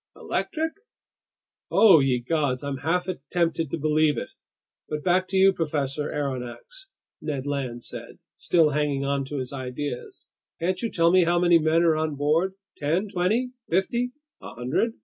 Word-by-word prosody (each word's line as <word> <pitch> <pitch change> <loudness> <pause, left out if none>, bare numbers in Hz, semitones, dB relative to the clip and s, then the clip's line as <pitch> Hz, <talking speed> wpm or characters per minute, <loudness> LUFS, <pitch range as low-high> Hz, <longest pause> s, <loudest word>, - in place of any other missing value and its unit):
"Electric?" 320 +1 -2 1.0
"Oh 195 -8 +7
ye 130 -3 +1
gods, 140 -2 0
I'm 140 -1 -3
half 175 +6 0 0.2
tempted 165 -3 0
to 165 - -2
believe 155 -2 +2
it! - - -5 0.6
But 150 -1 -3
back 185 +1 +2
to 190 - -1
you, 195 0 +6
Professor 150 -3 -2
Aronnax," 140 - -5 0.3
Ned 140 -3 -3
Land 130 -4 -3
said, - - -8 0.2
still 160 -4 +2
hanging 145 -1 0
on 140 0 0
to 145 +2 -5
his 130 +1 -4
ideas. 130 0 -6 0.3
"Can't 180 +2 -1
you 230 - -1
tell 170 -3 +3
me 185 -1 +5
how 175 +1 +2
many 175 -1 +5
men 160 +2 +3
are 165 -2 +4
on 155 -1 -1
board? 160 +7 +1 0.2
Ten, 165 +8 0
twenty, 215 +8 0 0.2
fifty, 235 +8 +1 0.3
a - - -9
hundred?" 130 - 0
155 Hz, 160 wpm, -25 LUFS, 140-180 Hz, 1.0 s, Oh